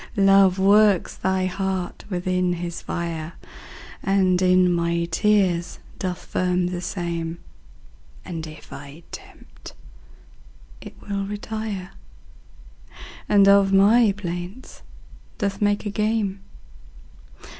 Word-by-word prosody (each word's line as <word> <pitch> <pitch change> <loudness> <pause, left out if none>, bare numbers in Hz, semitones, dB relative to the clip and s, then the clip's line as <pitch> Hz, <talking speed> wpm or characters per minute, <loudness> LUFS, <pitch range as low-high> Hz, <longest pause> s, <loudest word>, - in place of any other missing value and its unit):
Love 195 -1 +5
works 200 0 +4
thy 190 0 0
heart 190 -1 -3
within 180 -1 0
his 170 -1 -5
fire, 165 -1 -4 0.7
And 190 -2 +2
in 180 -1 +4
my 170 0 0
tears 180 -2 +1 0.2
doth 180 -1 -4
firm 180 0 0
the 180 -1 -4
same; 170 -2 -4 0.9
And 160 -2 -6
if 155 0 -12
I 145 +4 -11
tempt, - - -12 1.1
it - - -11
will 200 -1 -2
retire, 210 -2 -5 1.4
And 200 -1 +5
of 200 -1 +5
my 205 +3 +5
plaints 180 +5 -7 0.6
doth 200 -2 -2
make 205 +1 +1
a 205 - -2
game. 210 -2 -1
185 Hz, 100 wpm, -23 LUFS, 175-200 Hz, 1.4 s, Love